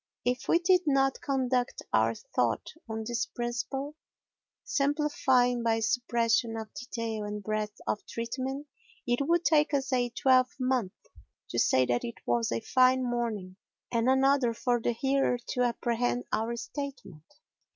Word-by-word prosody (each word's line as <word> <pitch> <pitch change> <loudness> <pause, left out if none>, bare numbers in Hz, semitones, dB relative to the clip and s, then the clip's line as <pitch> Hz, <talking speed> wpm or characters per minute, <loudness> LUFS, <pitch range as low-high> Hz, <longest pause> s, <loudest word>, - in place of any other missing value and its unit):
If 250 +1 -1
we - - +5
did 360 +1 +4
not 270 -1 +2
conduct 255 -3 -1
our - - +3
thought - - -1 0.2
on 220 0 -3
this 235 +1 -1
principle—simplifying 270 - -1
by 225 -1 +1
suppression 230 0 +1
of 220 -1 -7
detail 230 -3 -4
and 210 0 -5
breadth 215 0 -2
of 210 - -2
treatment—it 260 +1 -4
would 340 +4 +1
take 305 -1 +3
us 270 -1 -1
a 245 -1 +2
twelvemonth 255 -3 +2 0.6
to - - -1
say 130 - +4
that 120 -1 0
it 115 - -5
was 120 -1 +1
a 115 0 -1
fine 255 0 +3
morning 225 -7 -3 0.3
and 235 +1 +2
another 265 -2 +3
for 240 0 0
the 240 - 0
hearer 270 +1 +1
to 250 - -1
apprehend 245 0 0
our 225 +2 -1
statement. 265 - -7
245 Hz, 135 wpm, -29 LUFS, 225-270 Hz, 0.6 s, we